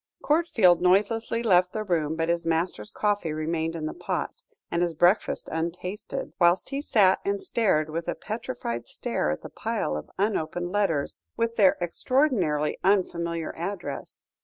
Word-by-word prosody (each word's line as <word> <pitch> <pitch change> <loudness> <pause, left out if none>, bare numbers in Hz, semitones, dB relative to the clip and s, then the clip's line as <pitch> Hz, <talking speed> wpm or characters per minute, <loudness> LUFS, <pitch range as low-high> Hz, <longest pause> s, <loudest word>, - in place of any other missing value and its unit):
Courtfield 270 - +4
noiselessly 215 +5 +2
left 180 -4 +4
the 215 - -2
room, 160 -6 0
but 165 0 -1
his 170 0 +1
master's 165 - -1
coffee 205 -6 0
remained 160 +1 -2
in 160 -2 -4
the 155 - -3
pot, - - -4 0.3
and 170 - 0
his 170 -2 0
breakfast 175 +6 +2
untasted, 170 +5 -4
whilst 175 +1 +3
he 275 +1 -2
sat 200 -9 +4
and 200 0 0
stared 190 -11 +1
with 165 +2 -4
a - - -1
petrified 220 - -5
stare - - -2
at 75 - -3
the - - -7
pile 75 - -2
of 75 - -6
unopened 175 -3 -1
letters, 185 -8 0 0.2
with 230 0 0
their 200 -5 +5
extraordinarily 175 - +1
unfamiliar 170 -4 0
address. 170 -5 -6
175 Hz, 155 wpm, -26 LUFS, 160-205 Hz, 0.3 s, their